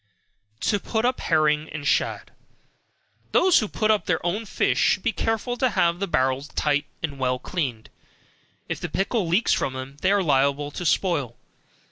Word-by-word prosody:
To 205 - +1
Put 220 +3 -1
up 255 +1 +1
Herring 155 -1 +1
and 145 -2 -5
Shad. - - 0 1.0
Those 370 -1 +5
that 215 - -3
put 215 0 +1
up 215 - 0
their 175 - +2
own 205 +6 -2
fish - - 0
should 190 - +2
be - - +1
careful 225 +3 -2
to 255 +1 +2
have 170 -5 +1
the 200 - -1
barrels 130 -1 0
tight 145 -1 0 0.2
and 140 -4 -4
well 125 -1 +1
cleaned, 130 -8 -4 0.8
if - - -3
the - - -4
pickle 200 0 -1
leaks 180 +8 +2
from 135 - -1
them, 130 +2 -7
they 190 - +3
are 200 -1 +3
liable 140 -1 +1
to 175 +3 -3
spoil. 145 - 0
170 Hz, 175 wpm, -24 LUFS, 140-205 Hz, 1.0 s, Those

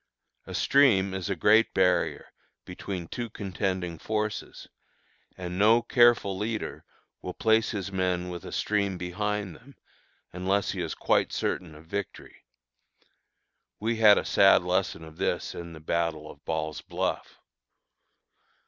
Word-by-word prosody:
A - - -6
stream 105 -9 +4
is 95 0 -4
a 100 - 0
great 110 +4 +4
barrier, 90 -1 +1 0.3
between 90 -1 -6
two 120 +5 -5
contending 95 -4 -3
forces, 110 -1 -4 0.7
and 90 0 -5
no 115 +3 +5
careful 120 -5 +4
leader 110 +3 -4 0.4
will 90 - -6
place 110 0 +2
his 100 -3 -4
men 90 -1 -1
with 90 -1 -7
a - - -8
stream 100 -3 0
behind 100 +1 -3
them, 140 - -17 0.6
unless 95 +3 0
he - - -4
is - - -3
quite - - +1
certain 80 -4 -3
of 80 +2 -14
victory. 100 +4 -7 1.3
We 115 +2 -1
had 105 -2 +7
a - - -1
sad - - +5
lesson 80 - -1
of 80 0 -12
this - - -1
in 85 -1 -8
the 80 - -10
battle 80 -1 -2
of 75 - -18
Ball's 80 -1 -3
Bluff. - - -3
95 Hz, 140 wpm, -27 LUFS, 90-105 Hz, 1.3 s, had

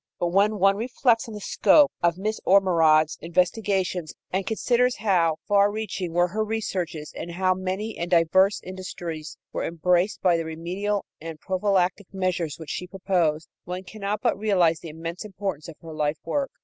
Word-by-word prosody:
But 175 - 0
when 205 +4 +3
one 195 +1 +4
reflects 235 0 +1
on 225 - -8
the - - -6
scope 285 +7 +4
of 170 0 +2
Miss 215 +3 -2
Ormerod's 165 -5 +4
investigations 180 -1 0 0.2
and 190 0 -1
considers 245 +2 +2
how 180 -7 +2
far 200 0 +4
reaching 205 -5 -4
were 175 +1 +2
her 215 +4 -1
researches 190 -8 -3
and 170 - -6
how 185 +1 +2
many 190 +4 -4
and 170 +1 -3
diverse 185 +3 +4
industries 175 -4 -7 0.2
were - - -2
embraced 175 +4 +1
by 175 -2 +4
the 165 - -3
remedial 180 +6 -3 0.2
and 160 -1 -7
prophylactic 185 0 0
measures 185 -5 -2
which 160 -2 -7
she 180 - -4
proposed, 180 -5 0 0.2
one 180 +1 -5
cannot 210 +1 -4
but - - +1
realize 180 -6 +2
the 165 - -9
immense 165 +3 -6
importance 195 -6 -5
of 165 - -9
her 165 -1 -8
life 150 0 -1
work. 280 -2 -1
185 Hz, 170 wpm, -25 LUFS, 170-205 Hz, 0.2 s, one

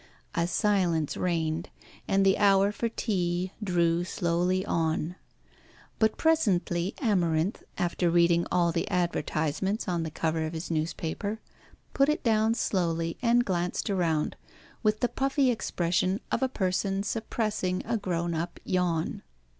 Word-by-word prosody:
A 170 -1 +1
silence 180 -6 +1
reigned, 165 -2 -1 0.4
and 195 0 +3
the 190 0 +4
hour 200 -1 +5
for 230 +2 -2
tea 180 -5 -1
drew 170 -3 +2
slowly 180 +1 0
on. 165 -1 -1 0.8
But 220 -1 +2
presently 195 - +1
Amarinth, 180 - +1 0.2
after 175 0 0
reading 170 0 +3
all 170 -1 +3
the 165 0 -2
advertisements 175 +3 -1
on 175 -2 0
the 160 - -3
cover 160 +1 -1
of 155 - -6
his 165 +2 -5
newspaper, 165 +6 -2 0.5
put 275 +1 +3
it 300 - 0
down 220 -1 +3
slowly 165 -6 -1
and 240 0 +3
glanced 180 +3 -1
around, 165 -5 0 0.5
with 215 -1 +1
the 245 - +3
puffy 270 0 +1
expression 185 -2 0
of - - 0
a 265 - +2
person 195 -2 0
suppressing 215 -4 -2
a 235 - 0
grown 175 -5 -1
up 170 +2 -3
yawn. 175 -3 0
180 Hz, 135 wpm, -28 LUFS, 170-210 Hz, 0.8 s, hour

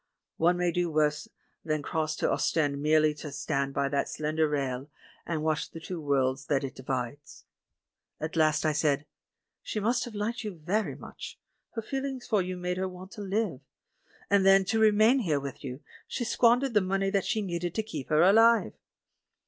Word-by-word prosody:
One 175 +2 +3
may 175 -1 +1
do 175 0 0
worse 150 -1 +1 0.4
than 155 -2 -1
cross 155 -1 -1
to - - 0
Ostend 145 -3 0
merely 155 0 +4
to 150 0 -8
stand 140 -1 -2
by 140 - +1
that 140 0 0
slender 155 +1 0
rail 135 -1 -2 0.4
and 160 -2 -2
watch 155 -1 0
the 165 - -9
two 165 +1 -6
worlds 135 -2 0
that 140 -1 +1
it 135 - -4
divides. 130 +1 -5 0.7
At 155 +2 -4
last 155 -1 +3
I 155 - +3
said: 150 -1 +1 0.6
"She 215 - -3
must 235 +4 +1
have 235 -3 -9
liked 225 +4 -2
you 210 -4 -5
very 185 +7 -1
much: - - -9 0.4
her 225 - -3
feelings 270 0 -4
for 215 -5 +2
you 180 0 -4
made 180 0 -2
her 190 0 -1
want 185 +1 -10
to 215 - -8
live 200 - -1 0.2
'. - - -48
— - - -29
and 200 -1 +5
then, 195 0 +6
to 225 +4 0
remain 220 +4 +5
here 160 - +1
with 140 +1 -7
you, 130 +1 -6 0.3
she - - -3
squan 240 +1 +3
dered 270 -3 -1
the 210 - +4
money 195 +1 0
that 200 -2 +1
she 220 -3 0
needed 175 -2 -3
to 220 - 0
keep 155 -11 -7
her 155 +1 +4
alive!" 225 +5 +5
170 Hz, 195 wpm, -28 LUFS, 150-205 Hz, 0.7 s, then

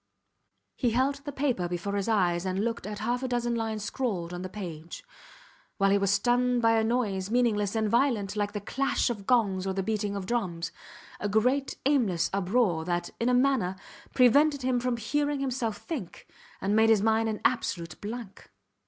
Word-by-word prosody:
He 245 - +2
held 260 +4 +1
the 290 - -4
paper 260 -10 0
before 175 +3 -3
his 200 0 -1
eyes 180 -5 +2
and 190 +1 -1
looked 230 -3 -3
at 210 0 -5
half 240 +4 -1
a 260 - -2
dozen 240 -1 -1
lines 220 -2 -2
scrawled 200 -7 -3
on 175 - -5
the 185 - -5
page, 175 - -7 0.7
while 195 -1 +3
he 200 - +4
was 195 -1 +1
stunned 245 +5 +2
by 230 -1 +4
a 225 -1 +3
noise 215 -5 0
meaningless 220 -4 +1
and 220 -1 +1
violent, 220 -4 +1
like 205 -1 -1
the 205 - -4
clash 270 +3 0
of 205 -4 -7
gongs 200 -6 +2
or 190 - 0
the 195 0 -2
beating 210 -1 -1
of 195 -2 -4
drums; 185 -7 -2 0.5
a 205 - -2
great 250 +7 +1
aimless 220 - +2
uproar 195 -3 +1
that, 175 0 -2
in 235 - +1
a - - +3
manner, 250 -8 +2 0.4
prevented 280 +3 +4
him 255 -1 +1
from 245 -1 -1
hearing 290 +5 -1
himself 245 -5 -2
think 255 - -7 0.4
and 200 +2 +1
made 220 +1 +5
his 215 -3 +4
mind 225 0 +2
an 215 - -3
absolute 175 -9 -1
blank. 215 -1 -7
220 Hz, 190 wpm, -28 LUFS, 195-245 Hz, 0.7 s, made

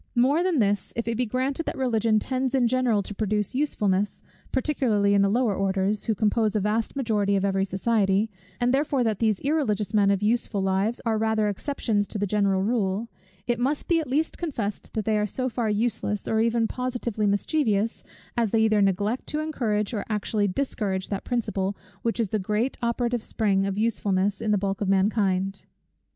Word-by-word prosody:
More 265 +7 +3
than 360 -3 +1
this; 205 -4 +1
if 230 0 -3
it 230 - 0
be 245 +1 0
granted 265 +7 -1
that - - -3
Religion 225 -4 +2
tends 260 +4 -1
in 250 -3 +3
general 240 -4 +2
to 205 - -7
produce 210 0 -1
usefulness, 210 -8 0 0.3
particularly 240 -7 +1
in 200 - +4
the 200 - +3
lower 230 0 +2
orders, 195 +1 0
who 220 - +1
compose 215 +1 +1
a - - +3
vast 215 +5 -1
majority 210 -6 +1
of 195 0 +1
every 195 0 +1
society; 195 +1 +1 0.3
and 245 +1 +2
therefore 280 -2 +1
that 220 -4 0
these 215 -4 +2
irreligious 265 -9 0
men 205 -2 +4
of 200 0 +1
useful 220 -1 +1
lives 195 +4 0
are 220 -1 +1
rather 220 -1 +1
exceptions 205 -1 -1
to - - -5
the 205 - 0
general 195 -1 +1
rule; 215 0 0 0.4
it 240 -1 0
must 285 +7 0
at 325 -3 +1
least 305 +5 0
be - - -22
confessed 235 -11 -3
that 215 -2 -2
they 215 -1 +2
are 210 - 0
so 255 +5 -2
far 230 -2 -1
useless, 210 -1 -1
or 220 - +1
even 230 0 +2
positively 240 -4 -2
mischievous, 215 0 0 0.3
as 235 -3 +1
they 225 +2 +2
either 215 -1 +3
neglect 200 +5 0
to 300 - -2
encourage 235 -9 -1
or 205 - -2
actually 210 -1 0
discourage 195 -4 -2
that 200 -1 -3
principle, 205 -5 -2 0.2
which 230 0 -1
is 225 -4 +1
the 215 - 0
great 210 +6 -1
operative 235 0 0
spring 200 -3 0
of 195 0 -3
usefulness 200 -3 0
in 220 - -1
the 210 - +3
bulk 195 0 -2
of 200 - 0
mankind. 195 -1 +1
215 Hz, 195 wpm, -25 LUFS, 200-240 Hz, 0.4 s, in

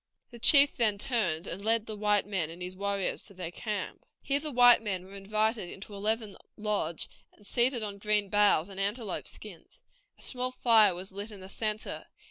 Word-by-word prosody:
The 235 - -12
chief 280 +3 +7
then 215 -4 +3
turned 200 -9 0
and 195 +2 -5
led 225 0 +2
the 215 - -6
white 210 -1 +1
men 190 -6 -2
and 165 +2 -10
his 180 +1 -6
warriors 200 0 -2
to 200 - -10
their 175 -2 -6
camp. 210 +3 -5 0.2
Here 280 0 +1
the 305 0 -4
white 245 -2 +6
men 190 -4 -3
were 190 - -14
invited 215 0 -1
into 200 +3 -10
a - - -7
leathern 215 -1 -1 0.2
lodge, 205 -6 0 0.3
and 205 - -21
seated 240 +1 +1
on 200 -1 -6
green 210 -1 +1
boughs 205 -5 +3
and 195 -1 -9
antelope 205 +1 -2
skins. 195 -6 -8 0.3
A - - -8
small 255 -1 -1
fire 225 -6 +4
was 185 +3 -6
lit 200 +3 -6
in 205 -2 -10
the 190 - -10
centre. 215 +1 -3
210 Hz, 200 wpm, -29 LUFS, 195-225 Hz, 0.3 s, chief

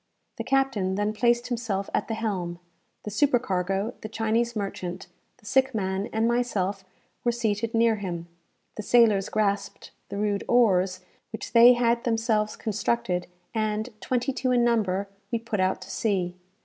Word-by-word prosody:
The - - -3
captain 265 -9 +1
then 205 +1 0
placed 240 +2 +2
himself 225 -5 -2
at - - 0
the 225 - -2
helm; 190 -6 -3 0.5
the 210 - -5
supercargo, 205 -5 +1
the 215 - -6
Chinese 225 +2 0
merchant, 185 -3 -4 0.3
the 235 - -24
sick 265 +2 +2
man, 190 -1 -1
and 220 +1 +1
myself 205 -5 0 0.4
were 240 - +2
seated 230 -1 -1
near 225 -1 +3
him; 175 -4 -5 0.5
the - - -2
sailors 215 -3 +4
grasped 200 -2 -1 0.2
the - - -5
rude 205 -1 0
oars 190 -6 +3 0.3
which 220 - -6
they 240 +1 +9
had 235 -1 +1
themselves 225 -2 0
constructed; 210 -4 -1 0.3
and, 215 +1 -1
twenty 255 +2 -1
two 255 0 -1
in 245 -1 +3
number, 200 -5 +1 0.2
we 235 - +1
put 225 -2 -4
out 185 0 +1
to - - -10
sea. 185 -5 -1
215 Hz, 155 wpm, -26 LUFS, 195-235 Hz, 0.5 s, they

